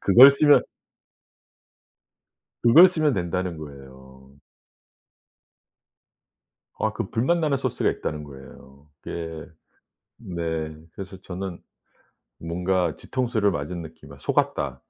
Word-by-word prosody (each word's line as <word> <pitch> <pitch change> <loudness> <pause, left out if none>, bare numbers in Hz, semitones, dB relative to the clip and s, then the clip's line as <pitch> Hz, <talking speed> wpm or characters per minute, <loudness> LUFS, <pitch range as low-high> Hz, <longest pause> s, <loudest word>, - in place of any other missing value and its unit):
그걸 125 +8 +9
쓰면 145 +1 +5 2.0
그걸 160 +11 +8
쓰면 155 -6 +1
된다는 90 -1 -2
거에요. 65 -1 -13 2.4
아 - - 0
그 - - -5
불맛 135 +10 +1
나는 150 -4 0
소스가 - - 0
있다는 75 -1 -5
거예요. 70 0 -14 0.2
예. 80 -2 -6 0.7
네. 80 -3 -4 0.2
그래서 95 -1 -9
저는. 90 -1 -6 0.8
뭔가 90 +2 -1
뒤통수를 115 -5 -1
맞은 85 +1 -4
느낌이 80 -3 -12
'아 70 - -14
속았다.' - - -1
85 Hz, 205 characters per minute, -24 LUFS, 75-115 Hz, 2.4 s, 그걸